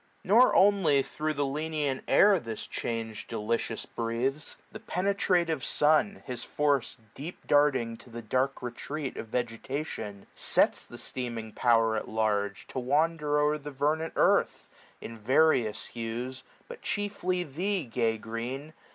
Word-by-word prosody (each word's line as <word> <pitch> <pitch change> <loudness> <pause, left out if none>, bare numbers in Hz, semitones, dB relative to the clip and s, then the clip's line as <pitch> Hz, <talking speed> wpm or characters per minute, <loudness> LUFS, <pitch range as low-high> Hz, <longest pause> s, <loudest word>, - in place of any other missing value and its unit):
Nor 230 +7 +5
only 185 -9 +5
thro' 155 +3 -3
the 145 -1 0
lenient 150 -1 -2
air, 200 -2 +6
this 115 -6 -6
change 115 -2 -4
Delicious 115 +1 -2
breathes; 120 +6 -2
the 215 - -8
penetrative 180 -6 0
sun. 155 +7 +3
His 125 -2 -3
force 145 -4 0 0.2
deep 160 +6 -8
darting 135 -6 +3
to 125 - -15
the 120 0 -7
dark 130 +5 0
retreat 135 +4 -4
Of 115 - -6
vegetation, 115 -3 -4
sets - - +2
the - - -11
steaming 115 -3 -4
Power 115 -2 +3
80 - - 0
At - - -12
large, 105 -2 -1
to - - -3
wander 150 +3 +1
o'er 150 +1 +2
the 145 0 -7
vernant 150 +4 -1
earth. - - +2 0.3
In 115 0 -8
various 115 -3 +3
hues; 120 +3 -5 0.3
but 485 -1 -10
chiefly 190 -3 -1
thee, 180 +5 -2
gay 115 -2 0
Green 120 +7 -5
135 Hz, 140 wpm, -29 LUFS, 115-155 Hz, 0.3 s, air